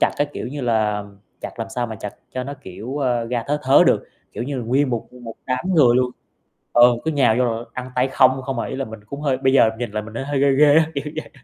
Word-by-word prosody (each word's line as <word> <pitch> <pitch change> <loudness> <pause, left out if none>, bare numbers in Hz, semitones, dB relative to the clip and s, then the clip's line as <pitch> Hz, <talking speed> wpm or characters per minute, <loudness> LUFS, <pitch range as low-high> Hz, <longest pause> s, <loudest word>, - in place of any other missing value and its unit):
chặt - - +4
á, 145 - +3
kiểu - - -5
như 140 +3 -5
là, 110 -4 0 0.4
chặt - - -8
làm 115 0 -4
sao 120 +1 -2
mà 110 - -7
chặt 105 - -6 0.2
cho 130 0 -3
nó 140 - -6
kiểu, 110 +10 -7
ơ, 125 -4 0
ra 120 0 -2
thớ 145 +1 0
thớ 135 +1 +6
được, - - +2 0.2
kiểu - - -4
như 140 +1 -4
là, 120 - -3
nguyên 130 +3 +1
một 120 -2 -3
một 120 -3 -9
đám 130 +5 -2
người 125 -7 +5
luôn 125 -1 +2 0.6
ừ, 120 0 +6
cứ 160 - 0
nhào 135 -7 +3
vô 125 - +3
rồi 115 -1 -2
ăn 125 0 -6
tay 125 +1 +1
không, 130 0 +3
không 135 -1 -3
à. - - -2
Ý - - -5
là 135 - -2
mình 110 -2 -10
cũng 140 +6 -7
hơi 140 -3 +1
bây 130 0 +1
giờ 125 -5 +5
nhìn 120 -3 -3
lại 105 +1 -3
mình 110 +1 -11
thấy 125 - -4
hơi 140 -1 -1
ghê 140 0 +4
ghê 145 +1 +5
á, 160 -1 +5
kiểu 140 - -3
vậy, 155 - -6
125 Hz, 285 wpm, -21 LUFS, 115-135 Hz, 0.6 s, thớ